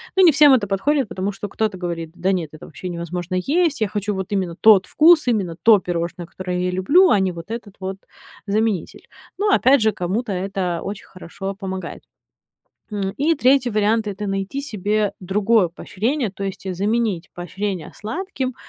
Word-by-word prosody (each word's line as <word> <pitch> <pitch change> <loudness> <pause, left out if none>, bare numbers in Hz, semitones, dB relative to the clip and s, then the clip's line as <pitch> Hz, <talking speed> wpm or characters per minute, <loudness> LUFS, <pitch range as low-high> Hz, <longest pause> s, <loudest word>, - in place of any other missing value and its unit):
Но 380 - +5
не 345 -3 +8
всем 290 -1 +6
это 225 -6 +2
подходит, 265 +6 +1
потому 190 +2 -2
что 200 0 -7
кто-то 215 -3 -2
говорит: 165 -2 -4
"Да 185 +2 0
нет, 165 -5 -2
это 155 - -11
вообще 180 +4 -8
невозможно 175 +1 -4
есть, 300 - +1
я 215 - +2
хочу 205 +1 -2
вот 190 +2 -5
именно 185 -4 -1
тот 205 -2 +6
вкус, 320 0 +5
именно 195 -8 0
то 220 -3 +7
пирожное, 175 0 -4
которое 180 +1 -4
я 180 - 0
люблю, 300 - +4
а 200 - +4
не 190 -1 +1
вот 170 +3 -10
этот 225 -4 -7
вот 190 0 -5 0.5
заменитель". 210 -3 -1 0.3
Ну, 415 0 +2
опять 270 - +5
же, 220 - +3
кому-то 205 +5 -3
это 185 -2 -2
очень 200 0 -6
хорошо 195 +2 -7
помогает. 190 -3 -6 0.9
М, 200 -3 -2
и 315 +4 +2
3 260 -2 +3
вариант- 215 +1 +1
это 205 +1 -4
найти 195 +8 -3
себе 210 -5 -1
другое 195 +1 +2
поощрение, 220 - -2
то 195 0 -5
есть 190 -1 -5
заменить 205 -2 -1
поощрение 180 0 -4
сладким 260 - -4
200 Hz, 175 wpm, -21 LUFS, 185-230 Hz, 0.9 s, не